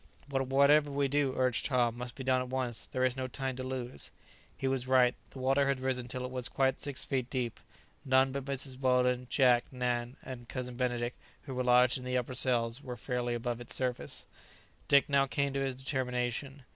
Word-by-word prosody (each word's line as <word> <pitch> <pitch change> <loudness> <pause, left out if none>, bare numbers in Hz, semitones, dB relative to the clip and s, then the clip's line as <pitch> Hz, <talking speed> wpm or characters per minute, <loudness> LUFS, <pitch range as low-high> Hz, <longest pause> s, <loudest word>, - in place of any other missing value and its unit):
"But 135 -2 -1
whatever 140 +2 +5
we 140 0 +1
do," 140 -1 +1
urged 130 -2 +1
Tom, 120 -4 +2
"must 125 0 -7
be 135 - -6
done 130 0 +2
at 125 - -5
once; 125 -3 -3
there 130 0 0
is 130 -1 +1
no 130 -1 -3
time 130 0 -3
to 130 - -4
lose." 130 -1 -5 0.5
He 135 - -2
was 130 -1 -1
right; 125 -1 +5 0.2
the - - -12
water 135 +2 +2
had 140 -1 +1
risen 130 -2 -1
till 125 0 -4
it 125 - -6
was 125 -1 -2
quite 135 -1 +1
six 145 -3 -3
feet 130 -3 -1
deep; 125 -3 -2 0.4
none 130 0 +3
but 135 0 -4
Mrs. 135 -1 -3
Weldon, 125 -1 +2
Jack, 125 -3 +4
Nan, 125 -1 -2
and 120 -2 -8
Cousin 125 -1 -4
Benedict, 120 -1 -1 0.3
who 135 - -7
were 125 0 -1
lodged 125 +1 +5
in - - -9
the 125 0 -1
upper 125 0 -2
cells, 120 0 +3
were 125 -3 -6
fairly 120 0 -2
above 120 0 -3
its 120 - -4
surface. 125 -2 -1 0.6
Dick 140 -1 +5
now 140 -1 +3
came 140 0 0
to 140 - -1
his 135 -1 -1
determination. 130 0 -2
130 Hz, 210 wpm, -31 LUFS, 125-135 Hz, 0.6 s, whatever